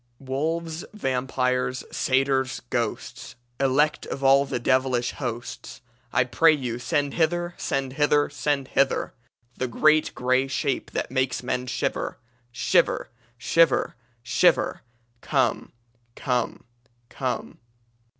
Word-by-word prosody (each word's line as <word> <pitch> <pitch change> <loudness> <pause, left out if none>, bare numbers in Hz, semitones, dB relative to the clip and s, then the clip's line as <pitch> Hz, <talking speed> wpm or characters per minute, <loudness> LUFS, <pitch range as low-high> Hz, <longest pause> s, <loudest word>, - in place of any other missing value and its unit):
"Wolves, 160 +5 -3
vampires, 130 -4 -1
satyrs, 130 -1 +1
ghosts! 120 -3 -3 0.2
Elect 140 +3 +2
of 140 - -5
all 135 +1 +5
the 135 - -2
devilish 130 0 +1
hosts! 120 -2 -6 0.3
I 125 - +3
pray 160 +6 +4
you 125 -5 -3
send 145 +1 -1
hither, 175 +1 0
Send 135 -1 -2
hither, 145 0 +3
send 140 0 -1
hither, 135 0 +1 0.4
The 130 - -1
great 155 +6 +3
grey 130 +2 +1
shape 140 0 -2
that - - -2
makes 130 -2 0
men 125 0 -2
shiver! 125 - -2 0.3
Shiver, 120 - +1 0.3
shiver, 165 +7 +2 0.3
shiver! 120 - +2 0.4
Come! 130 -6 0 0.4
Come! 125 -3 -1 0.5
Come!" 130 -2 -4
130 Hz, 110 wpm, -25 LUFS, 125-145 Hz, 0.5 s, all